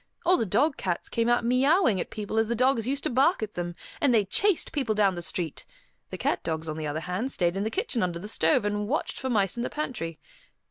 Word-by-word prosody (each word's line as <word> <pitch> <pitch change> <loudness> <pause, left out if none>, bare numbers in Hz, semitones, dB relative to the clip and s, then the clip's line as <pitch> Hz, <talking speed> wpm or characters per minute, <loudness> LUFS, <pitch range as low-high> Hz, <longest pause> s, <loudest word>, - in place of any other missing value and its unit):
All 365 - +6
the 225 - 0
dog 270 - +2
cats 175 -3 -2
came 230 0 0
out 240 0 +2
meowing 255 - +3
at - - -5
people 215 +1 -2
as 225 - +2
the 235 - -1
dogs 255 -1 +2
used 275 +1 0
to - - 0
bark 270 - +3
at 215 - -5
them, 175 -1 -4 0.3
and 285 - +4
they 220 -4 +4
chased 390 - +1
people 260 -7 -1
down 200 -2 +3
the 175 - -5
street; 170 -1 -4 0.5
the - - -6
cat - - 0
dogs, 160 0 -3
on 155 0 -4
the 155 -1 -3
other 150 +2 -3
hand, 185 +10 -3
stayed 175 -5 0
in 195 - -1
the 215 - 0
kitchen 275 - -1
under 175 -2 -1
the 190 +5 -7
stove, 240 +2 +2
and 205 0 -1
watched 295 +7 -2
for 260 - -3
mice 200 -3 +1
in - - -1
the - - -2
pantry. 215 - -4
220 Hz, 250 wpm, -27 LUFS, 180-260 Hz, 0.5 s, All